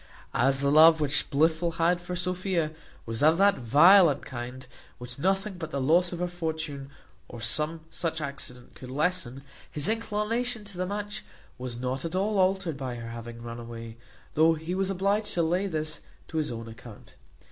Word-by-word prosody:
As 135 +3 +3
the 140 0 +2
love 160 +2 +8
which 145 -2 0
Blifil 160 +3 +2
had 175 +1 +2
for 180 0 -5
Sophia 180 -2 -1 0.3
was 115 0 -4
of 155 +2 +5
that 200 -3 +4
violent 155 - +6
kind, 130 0 -7 0.3
which 125 +2 -9
nothing 195 +3 0
but 160 -2 -5
the 140 - -3
loss 170 +6 +3
of 175 - -4
her 180 +1 -1
fortune, 160 -5 -4 0.4
or 120 - -9
some 150 +7 0
such 165 -1 -2
accident, 140 -4 -6
could 130 - -11
lessen, 140 -2 -1 0.3
his 150 +3 -1
inclination 225 +1 -1
to 200 -3 -10
the 185 - -1
match 205 +1 -4 0.4
was 125 -2 -5
not 130 +1 -2
at 165 +2 -4
all 200 +2 +1
altered 185 -4 +1
by 130 -3 -4
her 115 -1 -7
having 115 0 -8
run 120 0 -6
away, 115 -1 -8 0.4
though 160 +2 +4
he 160 +3 -5
was 190 0 0
obliged 200 +3 0
to 170 - +2
lay 180 +5 +1
this 155 -3 -3 0.3
to 160 - -4
his 155 -4 0
own 115 -1 -6
account. 115 -1 -12
160 Hz, 180 wpm, -28 LUFS, 130-185 Hz, 0.4 s, love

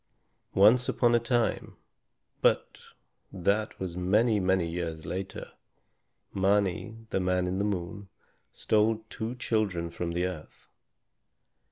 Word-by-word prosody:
Once 110 +6 +5
upon 120 -1 +3
a 120 - +5
time, 120 0 -1 0.7
but - - +1 0.5
that 100 +4 -1
was 90 -3 -4
many, 105 +5 +2
many 95 -2 +1
years 80 -2 -4
later, 95 +1 -5 0.8
Mâni, 100 +3 0
the - - +1
Man 90 0 +1
in 90 +1 -2
the - - +1
Moon, 100 0 -3 0.4
stole 110 +1 +1
two 115 +3 -4
children 100 -8 -1
from 85 0 -4
the 90 +1 0
earth. 90 -4 -8
95 Hz, 120 wpm, -28 LUFS, 90-110 Hz, 0.8 s, Once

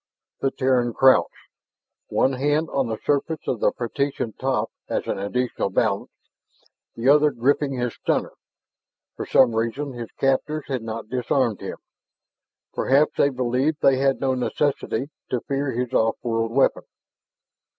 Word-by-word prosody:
The 135 - +1
Terran 130 -3 +1
crouched, 130 -1 +5 0.8
one 135 - +2
hand 145 +4 0
on 135 -3 0
the 110 -1 -3
surface 145 +2 -1
of 120 - -1
the - - +3
partition 125 -1 -3
top 130 -5 -1 0.2
as - - -1
an - - -2
additional 125 +5 -1
balance, - - 0 0.9
the 115 +2 -2
other 150 +2 +6
gripping 140 +2 +1
his 125 -2 -2
stunner. - - -1 0.8
For - - -6
some 125 -3 +5
reason 115 +5 -2
his 120 -2 -7
captors 140 +3 0
had 130 -4 -2
not 115 0 -6
disarmed 125 -2 0
him. - - -6 1.0
Perhaps 140 +3 +3
they 140 - +4
believed 130 +4 -1
they 135 -1 +5
had 135 0 +1
no 135 -1 +1
necessity 140 +2 -1 0.2
to 125 - -1
fear 140 0 -2
his 125 +1 -3
off 115 0 +2
world 115 -1 -1
weapon. 135 +3 +2
130 Hz, 145 wpm, -23 LUFS, 120-140 Hz, 1.0 s, other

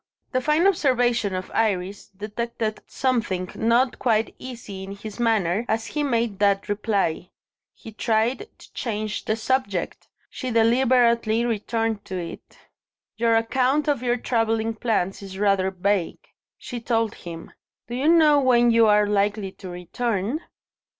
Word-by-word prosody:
The 255 - 0
fine 305 +6 +2
observation 245 - +2
of 185 0 -5
Iris 200 -3 -1
detected 215 +2 -4
something 215 -8 -1
not 235 +3 +2
quite 225 -3 +1
easy 230 -7 -8
in 195 +1 -7
his 210 +2 -9
manner, 220 -4 +1
as 225 +1 0
he 300 - -3
made 235 -7 0
that 200 -1 +2
reply. 205 -5 -1 0.5
He 225 - -11
tried 225 - 0
to - - -17
change 215 -3 -3
the 220 - +1
subject: 225 -5 -2 0.2
she 255 - -5
deliberately 235 -1 +3
returned 225 -1 -1
to 190 - -5
it. 170 -2 -8 0.6
"Your 230 0 +3
account 260 +6 +1
of 285 -5 +1
your 245 -1 +1
travelling 225 -2 0
plans 215 -5 -1
is 190 -1 -8
rather 195 -2 +2
vague," 190 -1 -2 0.3
she 245 - -6
told 225 -2 0
him. 165 -1 -9 0.4
"Do 240 - -7
you 260 +5 0
know 315 -3 +6
when 240 -3 +4
you 230 -1 +5
are 210 0 +5
likely 205 -1 0
to 190 - -10
return?" 205 - -2
225 Hz, 145 wpm, -24 LUFS, 200-245 Hz, 0.6 s, know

